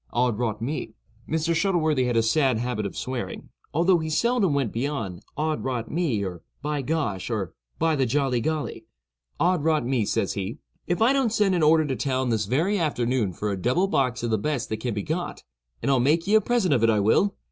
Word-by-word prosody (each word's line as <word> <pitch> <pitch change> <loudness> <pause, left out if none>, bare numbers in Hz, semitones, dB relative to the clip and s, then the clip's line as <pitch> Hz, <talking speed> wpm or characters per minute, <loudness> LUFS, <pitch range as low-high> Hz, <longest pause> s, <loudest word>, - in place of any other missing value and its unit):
Od 120 -2 +1
rot 110 -2 -2
me,"—(Mr. 145 +4 -3
Shuttleworthy 160 -7 +2
had 120 -1 +1
a 115 - +4
sad 130 +1 +2
habit 115 -3 -2
of - - -9
swearing, 130 -2 -5 0.2
although 175 +3 +3
he 160 0 -3
seldom 205 -1 +2
went 135 -6 0
beyond 115 -8 -3 0.2
"Od 155 +1 -1
rot 125 -4 -3
me," 140 - 0
or 90 -3 -6 0.2
"By 150 -1 -1
gosh," 125 - -2
or 105 -7 -2 0.2
"By 160 0 +2
the 135 -3 +1
jolly 130 -1 +1
golly,")—"Od 145 - -3
rot 155 -5 +2
me," 125 -4 +1
says 100 - 0
he, 100 +3 -4 0.3
"if 175 +5 +1
I 250 +4 +5
don't 265 -5 +2
send 210 -3 +2
an 175 - +1
order 155 +1 +5
to 135 -3 -1
town 130 +1 -1
this 110 -2 +1
very 170 - +1
afternoon 125 - 0
for 105 +5 -3
a 95 -2 -4
double 130 - +2
box 130 -10 0
of 120 - -1
the 110 - +2
best 140 +1 -2
that 110 - -2
can 115 0 -3
be 105 - -2
got, 175 +3 -4 0.4
and - - +2
I'll 135 - +4
make 150 +7 +2
ye 205 - 0
a 220 - +6
present 225 -10 +1
of 125 - +2
it, 115 - +5
I 110 -2 +3
will! 150 - +3
135 Hz, 210 wpm, -25 LUFS, 115-160 Hz, 0.4 s, a